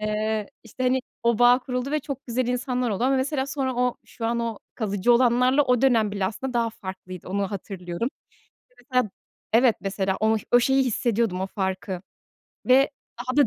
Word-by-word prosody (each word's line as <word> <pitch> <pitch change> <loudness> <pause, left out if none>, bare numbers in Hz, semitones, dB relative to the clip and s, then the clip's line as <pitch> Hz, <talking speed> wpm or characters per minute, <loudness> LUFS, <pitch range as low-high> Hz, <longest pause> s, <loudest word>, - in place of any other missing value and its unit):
eee, 215 0 -1
işte, 235 +3 -7
hani, 255 +1 +2 0.2
o 235 -1 +2
bağ 245 +1 +6
kuruldu 250 +1 -3
ve 305 - +1
çok 275 -1 -7
güzel 245 0 -1
insanlar 250 -1 -1
oldu 205 +4 -1
ama, 270 +1 +3
mesela, 265 +1 0
sonra 270 -2 -2
o 250 0 +1
şu 225 - -5
an 235 +1 0
o 230 -3 -3 0.2
kalıcı 210 +1 +1
olanlarla 250 +3 +4
o 250 -3 +2
dönem 225 -6 +3
bile, 200 -2 -1
aslında, 255 +6 -4
daha 230 -1 +1
farklıydı, 185 -3 -9
onu 195 0 -1
hatırlıyorum. 190 +1 -4 0.6
İşte, 250 - -32 0.2
mesela, 250 -5 +2 0.4
evet, 235 0 +5
mesela, 195 -1 -1
onu 220 +1 +3 0.2
o 245 - +7
şeyi 265 +2 +3
hissediyordum, 230 -5 0
o 190 - -1
farkı 190 -1 -3 0.6
ve 270 +3 +5 0.3
daha 255 +2 -3
da 285 -4 +6
235 Hz, 185 wpm, -25 LUFS, 205-255 Hz, 0.6 s, o